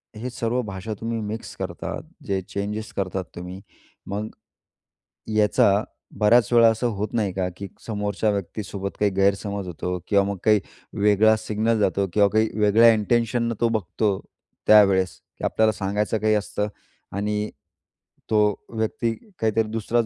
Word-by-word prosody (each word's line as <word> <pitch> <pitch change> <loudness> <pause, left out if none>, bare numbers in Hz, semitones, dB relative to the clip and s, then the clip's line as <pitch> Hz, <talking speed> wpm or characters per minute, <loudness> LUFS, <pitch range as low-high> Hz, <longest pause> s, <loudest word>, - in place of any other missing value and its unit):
हे 115 +4 -5
सर्व 120 0 -1
भाषा 100 +3 -5
तुम्ही 115 0 -2
मिक्स 110 +2 -6
करतात, - - -5 0.2
जे 95 -1 -1
चेंजेस 105 +3 -4
करतात 95 -1 -2
तुम्ही, 90 +2 -7 0.5
मग 105 +2 -3 1.1
याचा 105 0 +4 0.4
बऱ्याच 115 +2 +4
वेळा 115 -1 +7
असं 115 +2 -1
होत 105 +2 -3
नाही 105 -5 0
का 90 -1 -1
की 100 - -6 0.2
समोरच्या 105 0 -1
व्यक्तीसोबत 100 0 -4
काही 105 -1 +2
गैरसमज 100 0 +1
होतो 90 +1 -3
किंवा 100 -1 +4
मग 100 -1 -3
काही 105 -1 +5 0.4
वेगळा 105 +1 +5
सिग्नल 110 +1 0
जातो 100 -1 +1
किंवा 105 -1 +5
काही 110 0 +3
वेगळ्या 110 +3 +6
इन्टेंशननं 115 +2 +1
तो 115 - +4
बघतो 105 -2 0 0.5
त्यावेळेस 95 -4 +5 0.2
की - - -12
आपल्याला 110 0 +3
सांगायचं 105 +2 -1
काही 110 0 +2
असतं 105 0 -1 0.5
आणि 105 +1 -1 0.8
तो 110 - +3 0.3
व्यक्ती 110 0 -1 0.3
काहीतरी 110 0 +2
दुसऱ्याच 115 +1 0
105 Hz, 140 wpm, -24 LUFS, 100-110 Hz, 1.1 s, वेळा